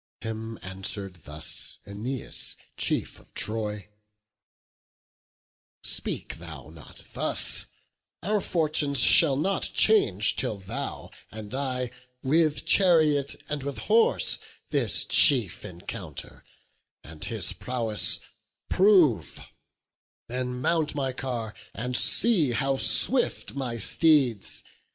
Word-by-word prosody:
Him 110 Hz, 0 st, -6 dB
answer'd 95 Hz, -1 st, -7 dB
thus 75 Hz, +1 st, -2 dB
Æneas, 110 Hz, +6 st, -4 dB, 0.2 s
chief -, -, -1 dB
of -, -, -24 dB
Troy: 105 Hz, -2 st, -2 dB, 1.9 s
"Speak -, -, -3 dB
thou 75 Hz, -, -11 dB
not 80 Hz, -3 st, -12 dB
thus; -, -, 0 dB, 0.6 s
our 205 Hz, +3 st, 0 dB
fortunes 150 Hz, -6 st, 0 dB
shall 145 Hz, -1 st, +6 dB
not 190 Hz, +6 st, -1 dB
change 110 Hz, -, +3 dB
Till 105 Hz, -, -2 dB
thou 95 Hz, -1 st, -7 dB, 0.2 s
and 110 Hz, +1 st, -10 dB
I, 130 Hz, -2 st, -3 dB, 0.3 s
with 155 Hz, +2 st, +1 dB
chariot 155 Hz, -7 st, +3 dB
and 150 Hz, -1 st, -4 dB
with 140 Hz, -2 st, -6 dB
horse, 220 Hz, -, +2 dB, 0.3 s
This -, -, +1 dB
chief 120 Hz, -, +4 dB
encounter, 85 Hz, -1 st, -9 dB, 0.6 s
and 75 Hz, 0 st, -9 dB
his 105 Hz, -6 st, -3 dB
prowess 115 Hz, -4 st, +1 dB, 0.5 s
prove; 180 Hz, -, +3 dB, 0.9 s
Then 125 Hz, 0 st, -5 dB
mount 160 Hz, 0 st, 0 dB
my 135 Hz, -2 st, -2 dB
car, 120 Hz, -5 st, -5 dB, 0.2 s
and 125 Hz, +4 st, -4 dB
see 150 Hz, -, +4 dB
how 135 Hz, +3 st, -1 dB
swift 105 Hz, -, +5 dB
my 125 Hz, -4 st, -5 dB
steeds. 125 Hz, -, +1 dB
125 Hz, 100 wpm, -26 LUFS, 105-150 Hz, 1.9 s, shall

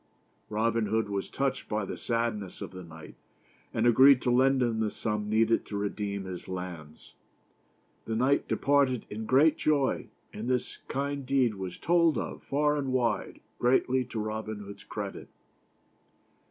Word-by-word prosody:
Robin 110 Hz, +1 st, +1 dB
Hood 110 Hz, 0 st, 0 dB
was 100 Hz, -1 st, -3 dB
touched 135 Hz, -1 st, -2 dB
by 105 Hz, -1 st, -1 dB
the -, -, -5 dB
sadness 115 Hz, -5 st, -2 dB
of -, -, -6 dB
the 95 Hz, -1 st, -9 dB
knight, 80 Hz, -2 st, -11 dB, 0.6 s
and 110 Hz, -, 0 dB
agreed 130 Hz, +3 st, +7 dB
to 125 Hz, -, +2 dB
lend 130 Hz, +1 st, +4 dB
him 115 Hz, -2 st, 0 dB
the 110 Hz, -1 st, +1 dB
sum 105 Hz, -1 st, -3 dB
needed 115 Hz, +1 st, +3 dB
to 105 Hz, -, -4 dB
redeem 100 Hz, -1 st, -3 dB
his 90 Hz, -1 st, -7 dB
lands. 90 Hz, -5 st, -7 dB, 0.9 s
The 110 Hz, -, -2 dB
knight 130 Hz, +5 st, +2 dB
departed 140 Hz, -4 st, +2 dB
in 110 Hz, +1 st, -5 dB
great 145 Hz, +5 st, +5 dB
joy, 145 Hz, -3 st, +1 dB, 0.2 s
and 110 Hz, +4 st, -4 dB
this 125 Hz, -1 st, -1 dB
kind 140 Hz, +1 st, -2 dB
deed 130 Hz, -3 st, +2 dB
was 95 Hz, -3 st, -6 dB
told 170 Hz, -2 st, +3 dB
of, -, -, -4 dB
far 150 Hz, +1 st, +1 dB
and 135 Hz, -2 st, -2 dB
wide, 125 Hz, -2 st, -1 dB, 0.2 s
greatly 130 Hz, +1 st, +3 dB
to 115 Hz, -, -5 dB
Robin 110 Hz, 0 st, -4 dB
Hood's 100 Hz, 0 st, -10 dB
credit. -, -, -6 dB
115 Hz, 155 wpm, -29 LUFS, 105-130 Hz, 0.9 s, agreed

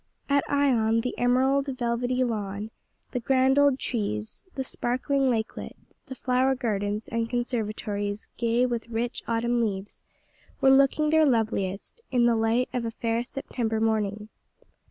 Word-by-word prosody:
At 280 Hz, 0 st, +3 dB
Ion, 235 Hz, -6 st, +2 dB
the 250 Hz, -, -3 dB
emerald, 265 Hz, +3 st, +2 dB
velvety 245 Hz, +1 st, 0 dB
lawn, 210 Hz, -2 st, -3 dB, 0.4 s
the 250 Hz, -, -1 dB
grand 265 Hz, +2 st, +3 dB
old 285 Hz, -2 st, +4 dB
trees, 110 Hz, -, -3 dB
the 265 Hz, -, -2 dB
sparkling 260 Hz, +2 st, 0 dB
lakelet, 225 Hz, -2 st, -3 dB, 0.3 s
the 260 Hz, -, -7 dB
flower 255 Hz, +1 st, +1 dB
gardens 210 Hz, -4 st, -2 dB
and 230 Hz, 0 st, -2 dB
conservatories 215 Hz, -4 st, -2 dB
gay 235 Hz, +1 st, +2 dB
with 235 Hz, -2 st, -3 dB
rich 235 Hz, +1 st, -2 dB
autumn 235 Hz, +1 st, +1 dB
hues, 200 Hz, -2 st, -4 dB, 0.6 s
were 265 Hz, -, +5 dB
looking 275 Hz, +3 st, +4 dB
their 315 Hz, 0 st, +5 dB
loveliest, 220 Hz, -, 0 dB
in 245 Hz, -2 st, +3 dB
the 235 Hz, -1 st, +4 dB
light 225 Hz, +3 st, +2 dB
of 245 Hz, -, -1 dB
a 230 Hz, -, -2 dB
fair 230 Hz, 0 st, -1 dB
September 240 Hz, -3 st, -3 dB
morning. 215 Hz, -1 st, 0 dB
235 Hz, 140 wpm, -26 LUFS, 220-260 Hz, 0.6 s, were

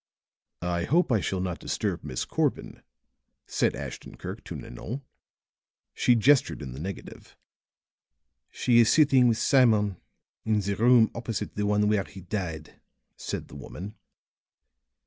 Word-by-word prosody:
"I 85 Hz, -1 st, -1 dB
hope 170 Hz, -1 st, +2 dB
I 115 Hz, -, +4 dB
shall 95 Hz, -1 st, -2 dB
not 90 Hz, -2 st, -3 dB
disturb -, -, -2 dB
Miss 65 Hz, -, -3 dB
Corbin," -, -, -2 dB, 0.6 s
said -, -, 0 dB
Ashton -, -, -8 dB
Kirk -, -, -7 dB
to -, -, -7 dB
Nanon. 125 Hz, -, -7 dB, 0.9 s
She 125 Hz, -, +3 dB
gestured 130 Hz, -, +3 dB
in 65 Hz, -, -6 dB
the 65 Hz, -, -8 dB
negative. 95 Hz, +4 st, -8 dB, 1.1 s
"She 120 Hz, -1 st, +3 dB
is 115 Hz, -, +5 dB
sitting 135 Hz, -5 st, +5 dB
with 115 Hz, -2 st, +2 dB
Simon 110 Hz, -7 st, +3 dB, 0.5 s
in 110 Hz, -1 st, +1 dB
the 100 Hz, 0 st, -2 dB
room 115 Hz, +1 st, +5 dB
opposite 115 Hz, -2 st, -4 dB
the 105 Hz, 0 st, -1 dB
one 105 Hz, 0 st, +2 dB
where 105 Hz, -2 st, +2 dB
he 95 Hz, -, -12 dB
died," 90 Hz, -5 st, -5 dB, 0.3 s
said -, -, -5 dB
the -, -, -13 dB
woman. 100 Hz, +4 st, -8 dB
105 Hz, 140 wpm, -27 LUFS, 95-120 Hz, 1.1 s, is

